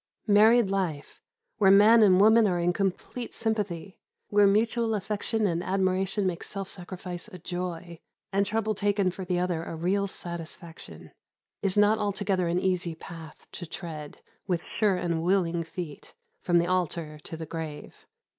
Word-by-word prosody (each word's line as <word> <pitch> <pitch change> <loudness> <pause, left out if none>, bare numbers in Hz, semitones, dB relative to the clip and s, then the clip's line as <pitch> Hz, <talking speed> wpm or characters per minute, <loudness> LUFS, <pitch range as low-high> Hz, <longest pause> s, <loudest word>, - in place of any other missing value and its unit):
Married 215 0 +5
life 175 -7 -3 0.4
where 195 -3 +5
man 210 +4 +7
and 190 -3 +6
woman 220 +2 +6
are 180 -2 +1
in 175 +1 +1
complete 195 +6 -3
sympathy, 200 -5 -3 0.3
where 205 0 +5
mutual 225 +2 +2
affection 210 +2 -1
and 175 -2 0
admiration 190 +1 0
make 180 -2 -2
self 195 -2 -5
sacrifice 180 -1 -7
a 185 - -10
joy, 175 -1 -5 0.3
and 200 0 +2
trouble 220 0 0
taken 200 -2 +1
for 190 - -7
the 180 -1 -1
other 175 -2 -1
a 165 - -6
real 190 +5 0
satisfaction 170 -2 -9 0.5
is 195 -1 0
not 210 +1 +4
altogether 200 -3 0
an 175 +1 +1
easy 180 -3 -1
path 160 -1 -11
to 175 - -7
tread, 155 -3 -8 0.3
with 175 -3 -1
sure 210 -3 +1
and 170 -2 -1
willing 175 -1 +1
feet, 165 -2 -8 0.3
from 175 -1 +2
the 170 - +3
altar 170 -4 -2
to 160 +2 -8
the 160 - -6
grave. 155 -2 -8
185 Hz, 155 wpm, -27 LUFS, 170-205 Hz, 0.5 s, man